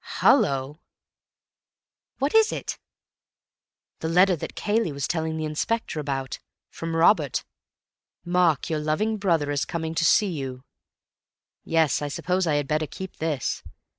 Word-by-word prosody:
Hallo!" 135 +2 +3 1.4
"What 275 +2 0
is 445 0 +5
it?" - - -4 1.2
"The 160 - -2
letter 180 +2 +5
that 160 - -7
Cayley 210 -4 0
was 140 -1 -3
telling 160 -1 -2
the 155 - -2
Inspector 155 +4 -2
about. 135 -3 -3 0.3
From 165 0 -4
Robert. 170 +6 +3 0.8
'Mark, 175 -4 +2
your 155 -2 -1
loving 180 +9 0
brother 165 -7 +1
is 145 -2 0
coming 160 -1 -3
to 165 +1 0
see 195 +5 +4
you—' 130 -5 -5 1.0
Yes, 160 -3 +2
I 145 - -2
suppose 180 +5 -1
I 150 - +2
had 145 -1 0
better 155 +1 0
keep 190 +4 -8
this. 155 -5 -2
160 Hz, 135 wpm, -25 LUFS, 145-180 Hz, 1.4 s, is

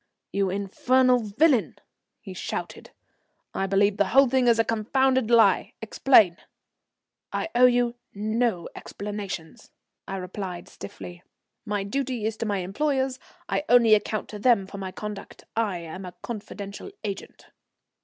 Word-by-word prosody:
"You 195 -1 +1
infernal 250 +6 +2
villain," 235 +4 +2 0.4
he - - -9
shouted, - - -6 0.6
"I 195 - -1
believe 200 +1 +2
the 205 - +2
whole 270 +7 +5
thing 255 0 +2
is 235 -1 +5
a 225 - +4
confounded 255 +3 +1
lie! 225 -5 +4
Explain." 220 -5 +4 0.9
"I - - -2
owe 250 +1 +7
you 245 -1 +2 0.2
no 215 -2 0
explanations," 200 -5 -7 0.4
I 195 - -4
replied 185 -1 -6
stiffly, 175 -3 -10 0.5
"my 205 -1 -1
duty 250 +1 -2
is 220 0 -1
to 225 - -3
my 200 -2 -1
employers. 265 +6 -1 0.3
I - - -1
only 235 -3 +6
account 215 0 +1
to 210 - -7
them 225 -4 +3
for 200 +1 -9
my 190 -1 -5
conduct. 210 +1 -8
I 215 -5 0
am 170 +3 -8
a 180 0 -9
confidential 205 - -7
agent." 200 -2 -7
210 Hz, 140 wpm, -25 LUFS, 195-245 Hz, 0.9 s, owe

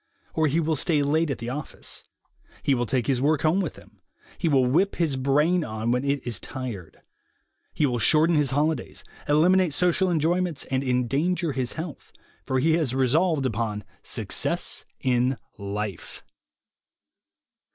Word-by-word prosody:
Or 160 -1 +2
he 150 +4 +1
will 160 -1 +1
stay 150 0 +1
late 155 +3 +1
at 140 - -2
the 115 +1 -5
office; 150 +3 -6 0.6
he 140 - +3
will 120 -2 0
take 125 -1 0
his 130 -1 +1
work 150 +1 +2
home 165 +5 +3
with 170 - -4
him; - - -18 0.4
he 165 - +1
will 135 -3 +4
whip 170 +11 +2
his 160 -5 0
brain 150 +7 +2
on 110 -2 -2
when 125 +2 +1
it 140 -1 -1
is 120 -5 -2
tired; 120 - -7 0.7
he 150 - +1
will 120 -3 0
shorten 155 +8 +4
his 145 -3 +2
holidays, 145 0 -1 0.3
eliminate 175 +2 +4
social 180 +2 +2
enjoyments 170 0 0
and 130 0 +1
endanger 140 +7 0
his 130 -3 -2
health, 160 -2 -7 0.4
for 130 - +1
he 160 +5 +3
has 155 -6 +1
resolved 145 +3 +2
upon 110 -3 -2 0.2
Success - - -1 0.2
in 125 0 +1 0.2
Life. 100 -1 -5
140 Hz, 155 wpm, -25 LUFS, 125-160 Hz, 0.7 s, will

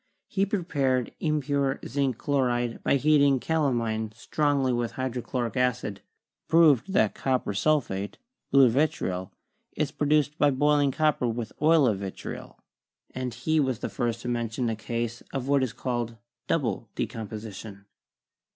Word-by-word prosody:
He 195 0 0
prepared 140 - 0
impure 145 -3 0
zinc 135 -4 -1
chloride 120 -4 0
by - - +2
heating 140 -1 +4
calamine 120 -8 0
strongly 140 +1 +1
with 120 -1 -1
hydrochloric 125 -1 -3
acid; 125 -6 0 0.5
proved 165 +1 +4
that 110 - +3
copper 130 -6 -1
sul 150 +9 +3
phate, 100 -3 -5 0.3
blue 135 -1 +6
vitriol, 110 -9 0 0.5
is 150 -2 0
produced 150 +1 +1
by 145 - +5
boiling 145 +1 +3
copper 150 -4 +1
with 115 -1 -3
oil 155 -1 +5
of 105 -6 +1
vitriol; 95 -1 -7 0.6
and 130 -1 -3
he 155 +6 +1
was 130 -5 +1
the - - -4
first 120 -2 -2
to - - -5
mention 120 0 -1
a - - -2
case 115 +1 -3
of 135 -2 -3
what 140 -1 +3
is 130 -3 0
called 120 -2 -3 0.3
double 120 -7 -1
decomposition. 105 -2 -6
130 Hz, 140 wpm, -27 LUFS, 115-145 Hz, 0.6 s, blue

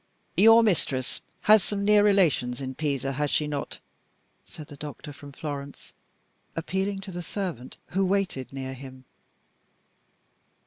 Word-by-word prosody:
"Your 225 +5 +7
mistress 140 - 0 0.2
has 215 -2 +6
some 200 0 -2
near 210 0 +6
relations 165 -12 +3
in 130 -1 -4
Pisa, 140 -2 -1
has 145 +2 -1
she 150 - +1
not?" 145 -1 -4 0.7
said 155 - -10
the 145 - -12
doctor 145 0 -8
from 145 0 -12
Florence, 140 -1 -7 0.6
appealing 190 +4 -2
to 195 0 -8
the 175 0 -5
servant 175 - -5
who 195 +2 +1
waited 185 -9 0
near 135 -1 -5
him. 130 0 -11
150 Hz, 135 wpm, -27 LUFS, 135-195 Hz, 0.7 s, Your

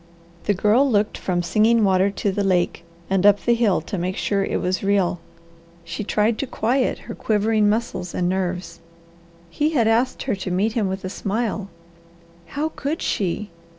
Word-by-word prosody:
The 205 - +2
Girl 220 +9 +3
looked 210 -2 +1
from 175 -2 -1
Singing 220 +6 +3
Water 190 0 +3
to 200 0 -1
the 200 +1 -1
lake, 180 -3 +1 0.2
and 190 -1 +1
up 205 0 +5
the 240 - +4
hill 230 -7 +2
to 175 +4 -5
make 185 +2 -2
sure 200 -1 0
it - - -1
was 185 +1 -1
real. 195 -3 +1 0.6
She 170 +5 -5
tried 215 +2 +1
to 275 - -2
quiet 250 +3 0
her 230 - -6
quivering 215 -1 +1
muscles 210 -5 -2
and 175 - 0
nerves. 180 -2 -2 0.7
He 300 - 0
had 235 -7 +3
asked 235 +3 +1
her 260 - -1
to 190 -1 -5
meet 195 +5 0
him 220 -4 0
with 190 0 -4
a - - -3
smile. 205 0 -2 0.8
How 300 +2 -2
could 310 +1 -4
she? 195 +1 -2
205 Hz, 180 wpm, -22 LUFS, 185-225 Hz, 0.8 s, up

